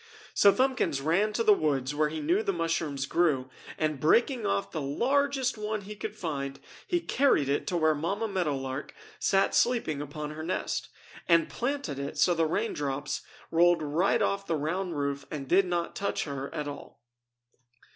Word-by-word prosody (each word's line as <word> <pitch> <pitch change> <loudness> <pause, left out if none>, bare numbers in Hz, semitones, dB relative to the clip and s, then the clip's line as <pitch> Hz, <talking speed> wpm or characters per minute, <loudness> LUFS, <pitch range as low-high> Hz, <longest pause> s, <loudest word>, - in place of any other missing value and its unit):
So 200 - +6
Thumbkins 255 - +1
ran 170 +9 +2
to 230 - +1
the 215 - +7
woods 145 -6 0
where 150 +1 +1
he 160 +1 -4
knew 170 +8 +2
the 200 - 0
mushrooms 165 -5 -1
grew, 140 -6 +1 0.3
and 155 -3 -1
breaking 235 - +3
off 100 0 -1
the 155 - -3
largest 260 - +1
one 215 0 -2
he 205 +2 -8
could 210 - -6
find 140 -5 -4 0.3
he 355 -3 +1
carried 275 - +2
it 140 +1 0
to 175 - 0
where 160 -1 +3
Mamma 195 +9 -2
Meadow 180 -8 0
Lark 135 +1 -5 0.2
sat 195 0 +2
sleeping 230 - +1
upon 150 +1 -5
her 155 +1 -7
nest, 170 +4 -2 0.4
and 170 -1 +4
planted 245 - -2
it 140 +1 -5
so 180 - +4
the 165 -1 +1
raindrops 150 -7 -2 0.3
rolled 170 0 +4
off 190 +5 +1
the 165 - +1
round 165 +3 -2
roof 140 0 -2
and 140 -4 -5
did 185 +5 +4
not 175 -1 -2
touch 200 - -1
her 140 -2 -5
at 150 -1 -4
all. 145 - -9
165 Hz, 175 wpm, -29 LUFS, 145-200 Hz, 0.4 s, the